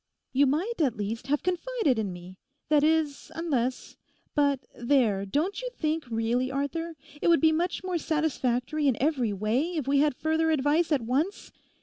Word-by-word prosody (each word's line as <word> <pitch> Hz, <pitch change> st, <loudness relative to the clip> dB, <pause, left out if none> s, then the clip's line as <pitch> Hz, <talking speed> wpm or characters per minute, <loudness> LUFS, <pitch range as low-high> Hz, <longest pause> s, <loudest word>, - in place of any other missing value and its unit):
'You 275 Hz, +2 st, +4 dB
might, 345 Hz, -, -1 dB
at 265 Hz, -8 st, +1 dB
least, 215 Hz, +4 st, -4 dB
have 290 Hz, +1 st, 0 dB
confided 365 Hz, -, 0 dB
in 205 Hz, -3 st, -2 dB
me; 180 Hz, +1 st, -11 dB, 0.3 s
that 300 Hz, -1 st, +4 dB
is, 310 Hz, -2 st, +1 dB
unless—But 280 Hz, -1 st, -2 dB
there, 235 Hz, -6 st, +1 dB
don't 320 Hz, -, -1 dB
you -, -, -3 dB
think 310 Hz, -4 st, -1 dB
really, 230 Hz, +3 st, 0 dB
Arthur, 285 Hz, +5 st, -3 dB, 0.3 s
it -, -, +1 dB
would 335 Hz, -2 st, +5 dB
be 315 Hz, +2 st, +5 dB
much 345 Hz, +3 st, -1 dB
more 365 Hz, -2 st, -1 dB
satisfactory 300 Hz, -2 st, 0 dB
in 260 Hz, -, +2 dB
every 265 Hz, -6 st, +1 dB
way 230 Hz, -, 0 dB
if 295 Hz, -5 st, -2 dB
we 280 Hz, 0 st, +3 dB
had 295 Hz, -2 st, +2 dB
further 320 Hz, +2 st, +1 dB
advice 310 Hz, +3 st, +2 dB
at 285 Hz, -4 st, +3 dB
once? 285 Hz, -, -1 dB
290 Hz, 165 wpm, -27 LUFS, 250-320 Hz, 0.3 s, would